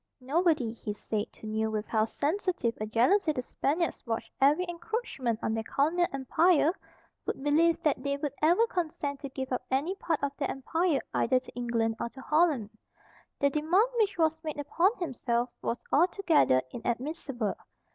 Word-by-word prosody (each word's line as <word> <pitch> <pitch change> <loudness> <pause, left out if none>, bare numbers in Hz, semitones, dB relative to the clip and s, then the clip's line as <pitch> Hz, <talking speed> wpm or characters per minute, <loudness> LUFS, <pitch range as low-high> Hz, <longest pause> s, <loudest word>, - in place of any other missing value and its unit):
Nobody, 280 -3 +1
he 215 -2 -5
said, 210 0 -3
who - - -12
knew 220 0 -1
with 215 0 -2
how 220 -1 +1
sensitive 310 - -1
a 215 - -2
jealousy 310 - +3
the 255 - -3
Spaniards 320 +7 -1
watched 225 0 -3
every 295 +7 +4
encroachment 345 - -3
on 220 - 0
their 225 - -1
colonial 320 +9 +1
empire 310 +4 +3 0.6
would 270 - -3
believe 320 +3 +3
that 295 -4 +1
they 280 +1 -1
would 285 -1 -3
ever 345 +9 +5
consent 320 -8 -3
to 275 - -6
give 265 0 -5
up 250 - -1
any 280 +8 +1
part 335 -6 -2
of 280 - +1
that 280 - -1
empire 320 +3 0
either 255 +2 +3
to 255 - -14
England 230 -2 -1
or 235 - -2
to 265 - -12
Holland. 300 -9 +2 0.7
The 280 0 +2
demand 345 - +3
which 405 -3 +2
was 320 -1 +3
made 310 -2 -4
upon 335 +6 +3
himself 245 -7 -1
was 235 - -1 0.2
altogether 325 - +4
inadmissible. 240 - -3
280 Hz, 165 wpm, -29 LUFS, 235-335 Hz, 0.7 s, ever